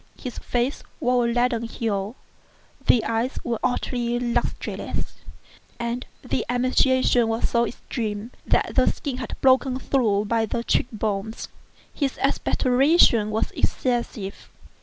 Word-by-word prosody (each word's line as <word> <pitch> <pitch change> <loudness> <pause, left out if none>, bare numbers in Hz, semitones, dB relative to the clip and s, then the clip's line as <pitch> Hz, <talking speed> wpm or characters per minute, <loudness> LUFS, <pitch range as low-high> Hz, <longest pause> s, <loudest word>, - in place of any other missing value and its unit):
His 250 - -6
face 245 +3 -1 0.2
wore 250 -4 +2
a - - 0
leaden 240 -1 +1
hue; 220 -2 -3 0.7
the 235 - +5
eyes 230 +4 -1
were 235 -2 -2
utterly 240 -1 0
lustreless; 240 -1 -3 0.6
and 235 +1 -3 0.2
the - - 0
emaciation 255 -1 +3
was 225 +1 0
so 235 0 +2
extreme 215 -1 -4
that - - +1
the - - +4
skin 275 -4 -5
had 250 -3 -4
been - - -6
broken 260 0 +4
through 220 -7 +1
by 225 +1 +1
the 235 - -2
cheek - - +1
bones. 215 0 -3 0.4
His 275 -3 -1
expectoration 255 -4 +3
was 215 +1 -1
excessive. 235 -5 -2
240 Hz, 130 wpm, -24 LUFS, 225-250 Hz, 0.7 s, the